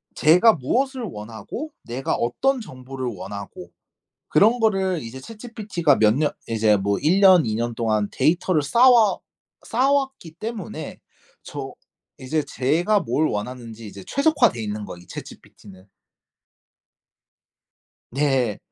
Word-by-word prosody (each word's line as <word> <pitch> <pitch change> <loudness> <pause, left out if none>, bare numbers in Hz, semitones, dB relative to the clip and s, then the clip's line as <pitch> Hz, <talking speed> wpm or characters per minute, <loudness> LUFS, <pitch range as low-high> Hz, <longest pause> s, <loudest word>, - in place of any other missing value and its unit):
제가 180 +9 +5
무엇을 255 - -1
원하고 110 - -7
내가 125 +3 -3
어떤 255 - 0
정보를 130 -6 -7
원하고 100 -3 -7 0.6
그런 225 +4 +4
거를 190 -6 +1
이제 115 +2 -8
ChatGPT가 210 - -1
몇 105 -1 +4
년 150 +1 +1 0.2
이제 110 -2 +2
뭐 100 +1 -1
1 170 +7 +2
년, 185 -5 +7
2 110 -1 -1
년 120 +1 -2
동안 110 -3 0
데이터를 170 -1 +1
쌓와 235 - +5 0.5
쌓아왔기 270 - 0
때문에 215 -7 -6 0.4
저 - - -7 0.5
이제 150 +4 -1
제가 160 +10 +1
뭘 145 +7 0
원하는지 115 0 -6
이제 100 -1 -10
최적화돼있는 175 - +1
거 90 - -9
이 90 - -15
ChatGPT는. 95 -1 -12 2.2
네. 135 -5 +1
145 Hz, 265 characters per minute, -23 LUFS, -, 2.2 s, 년